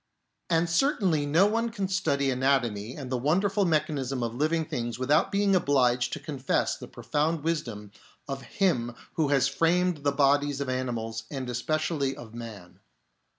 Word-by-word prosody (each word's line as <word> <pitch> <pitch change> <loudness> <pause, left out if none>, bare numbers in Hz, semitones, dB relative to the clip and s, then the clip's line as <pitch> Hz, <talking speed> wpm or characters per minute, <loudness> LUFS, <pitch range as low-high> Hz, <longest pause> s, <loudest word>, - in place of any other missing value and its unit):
And 165 0 +2
certainly 170 - +1
no 165 +7 +5
one 230 +3 +1
can 200 -4 -3
study 140 -8 +1
anatomy 125 -4 0
and 135 -3 -7
the 125 - 0
wonderful 195 - +2
mechanism 140 -6 0
of 115 -1 -2
living 155 +5 0
things 120 -4 -4
without 135 +4 +2
being 200 -1 +2
obliged 125 -7 +2
to - - -3
confess 140 -2 -1
the - - -10
pro - - -12
found 155 +1 0
wisdom 120 -11 -3 0.4
of 135 -1 -4
Him 125 -10 0 0.2
Who 155 -3 +1
has 140 -1 +3
framed 170 +5 +2
the 145 -1 0
bodies 140 0 +2
of 140 -2 -3
animals 115 -3 -3
and 135 -3 -5
especially 145 +2 -1
of 115 -2 -11
man. 110 -6 -9
140 Hz, 160 wpm, -27 LUFS, 125-165 Hz, 0.4 s, no